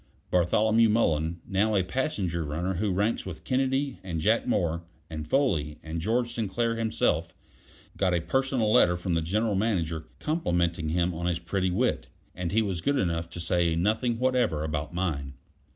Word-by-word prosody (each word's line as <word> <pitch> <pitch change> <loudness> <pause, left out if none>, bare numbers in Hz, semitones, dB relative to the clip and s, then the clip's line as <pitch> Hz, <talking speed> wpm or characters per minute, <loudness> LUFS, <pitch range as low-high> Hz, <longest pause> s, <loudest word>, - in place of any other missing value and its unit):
Bartholomew 110 +6 +4
Mullen, 85 -6 +1
now 105 +3 +1
a 95 - +3
passenger 95 - -1
runner 80 +6 -2
who 100 +3 -1
ranks 105 +5 0
with 90 -4 -8
Kennedy 135 +2 0
and 85 -4 -4
Jack 110 +9 +2
Moore 85 -8 0 0.3
and 80 -1 -5
Foley 80 - +1
and 80 +1 -4
George 120 +5 0
Sinclair 115 +1 -1
himself, 115 -1 0 0.6
got 95 -2 +2
a 90 - +2
personal 130 +2 +1
letter 90 0 +5
from 90 0 -2
the 80 - +1
General 105 +7 0
Manager 85 -6 -1
complimenting 85 - 0
him 85 +2 +1
on 85 +1 -3
his 90 -2 +1
pretty 90 +2 -1
wit; 110 +8 0 0.3
and 90 -1 -3
he 110 +3 +3
was 95 -5 -2
good 140 +9 +1
enough 85 -4 -1
to 85 - -8
say 85 -1 +1
nothing 110 +7 +1
whatever 125 -11 +1
about 75 -1 -3
mine. 75 -7 -2
90 Hz, 170 wpm, -27 LUFS, 85-115 Hz, 0.6 s, letter